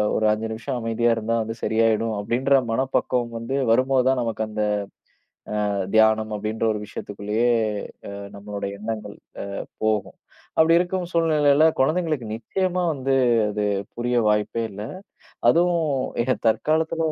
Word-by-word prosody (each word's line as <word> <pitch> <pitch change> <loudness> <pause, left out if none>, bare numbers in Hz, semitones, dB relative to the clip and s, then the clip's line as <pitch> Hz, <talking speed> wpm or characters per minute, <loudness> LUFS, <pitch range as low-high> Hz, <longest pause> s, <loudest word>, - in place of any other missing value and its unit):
ஒரு 110 - +1
5 110 +1 -1
நிமிஷம் 120 +4 -4
அமைதியா 115 +1 +1
இருந்தா 115 +1 -1
வந்து 110 +1 -4
சரியாயிடும் 115 0 +2
அப்டின்ற 125 +6 0 0.2
மனப்பக்குவம் 125 0 0
வந்து 115 +4 -3
வருமோது 130 +2 +3
தான் 130 -1 +2
நமக்கு 115 -1 -3
அந்த, 105 0 -4 1.1
அ, - - 0 0.3
தியானம் 110 0 +4
அப்டின்ற 110 +2 -2
ஒரு 105 - -4
விஷயத்துக்குள்ளயே, 105 +4 -1 0.6
அ, - - -7 0.2
நம்மளுடைய 100 0 -5
எண்ணங்கள், 110 0 -5 0.3
அ, - - -6 0.3
போகும். 110 -3 0 0.4
அப்டி 165 +1 +5
இருக்கும் 180 0 -1
சூழ்நிலையில 155 -3 +4 0.2
குழந்தைகளுக்கு 155 -4 0
நிச்சயமா 180 - -1
வந்து 135 -1 0 0.3
அது 105 0 -1 0.3
புரிய 120 +1 -1
வாய்ப்பே 105 +2 0
இல்ல. 100 - -8 0.7
அதுவும் 170 -1 +3 0.4
இட 130 - 0 0.2
தற்காலத்துல 160 +6 +1
115 Hz, 130 wpm, -23 LUFS, 110-145 Hz, 1.1 s, அப்டி